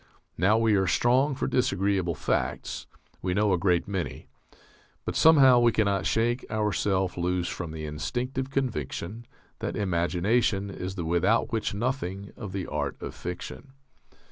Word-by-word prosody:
Now 100 +6 +3
we 115 -1 +3
are 95 -2 +2
strong 130 - +3
for - - -2
disagreeable 95 -7 +1
facts. - - -2 0.3
We 90 -1 -1
know 105 -1 +3
a - - +3
great 90 -1 +2
many. 95 -3 -4 0.8
But - - -3
somehow 135 -6 +7
we 120 -1 +5
cannot 100 -3 +1
shake 120 +3 +1
ourself 100 -4 0
loose 90 0 0
from 90 -2 -4
the 80 -1 -6
instinctive 125 - -3
conviction 115 - -3 0.3
that - - -3
imagination 100 +2 +1
is 95 0 -5
the 85 -4 -4
without 85 +7 +2
which 110 -3 -1
nothing 100 -4 -3
of 105 -5 -7
the 95 -1 -3
art 75 -1 -3
of - - -6
fiction. 90 +9 -7
100 Hz, 145 wpm, -27 LUFS, 90-120 Hz, 0.8 s, somehow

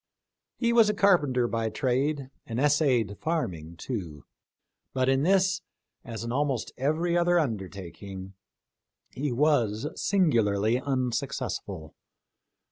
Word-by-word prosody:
He 235 -1 +1
was 230 -3 +6
a 210 - 0
carpenter 145 -12 +3
by 115 -1 -1
trade, 135 +3 -1 0.2
and 115 +1 -3
essayed 135 -8 +2
farming 90 - -3
too; 85 - -5 0.7
but 130 -1 +2
in 135 0 +3
this, 190 +3 +3 0.4
as 115 -3 -6
in 115 - -4
almost 135 -2 -1
every 155 +6 0
other 175 0 +3
undertaking, 95 - -4 0.8
he 140 +1 -2
was 120 -4 +2
singularly 115 - +2
unsuccessful. 125 - -3
130 Hz, 110 wpm, -27 LUFS, 110-155 Hz, 0.8 s, was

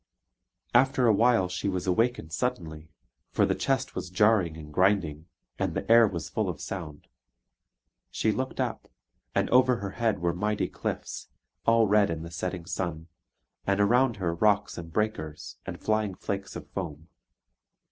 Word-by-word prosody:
After 130 +1 +4
a 115 - +6
while 115 -3 +4
she 90 +2 -2
was 90 -2 -2
awakened 95 -4 0
suddenly; 80 -9 -3 0.4
for - - +2
the - - +1
chest - - -1
was - - -5
jarring 95 -4 +3
and 75 -1 -10
grinding, 90 -4 +1 0.3
and - - -1
the - - -3
air 115 -1 +8
was 85 -5 -4
full 110 -4 -1
of 80 -4 -5
sound. 80 -6 -7 1.0
She 110 - +1
looked 130 +4 -3
up, - - -2 0.5
and - - +2
over 130 0 +5
her 100 -4 -5
head 115 +1 0
were 85 -1 0
mighty 105 +4 -1
cliffs, - - -5 0.4
all 115 0 +5
red 105 0 +4
in 80 -1 -3
the 85 - -8
setting 90 +1 -4
sun, 85 -3 -4 0.6
and 100 0 +2
around 120 +4 +4
her 90 -4 -1
rocks 105 +3 +2
and 80 -1 -8
breakers, 80 -7 -3
and - - -5
flying 110 -3 0
flakes 100 +1 -4
of - - -7
foam. 80 -4 -5
95 Hz, 160 wpm, -28 LUFS, 85-110 Hz, 1.0 s, air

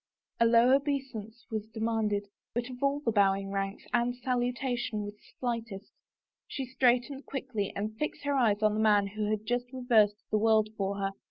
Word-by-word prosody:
A 230 - +5
low 235 +3 +6
obeisance 265 -6 -3
was 215 -1 -3
demanded, 220 -2 -1 0.3
but 240 +1 -2
of 250 - -10
all 280 +1 +1
the 235 - +1
bowing 195 -2 +2
ranks 195 0 -3
Anne's 245 +1 +1
salutation 245 -3 -1
was 205 0 -6
the 210 - -24
slightest; 230 -5 -4 0.6
she 270 - -4
straight 250 -1 +3
ened 275 0 -8
quickly 250 -7 -3
and 215 +2 -3
fixed 300 - -3
her 285 0 0
eyes 220 -6 +2
on 215 -1 +4
the 215 - -1
man 210 -2 +4
who 210 +1 -3
had 215 0 -1
just 245 +2 -1
reversed 225 -5 +3
the 215 - +3
world 220 -1 +4
for 200 -1 -1
her. 195 -1 -1
225 Hz, 185 wpm, -30 LUFS, 210-250 Hz, 0.6 s, low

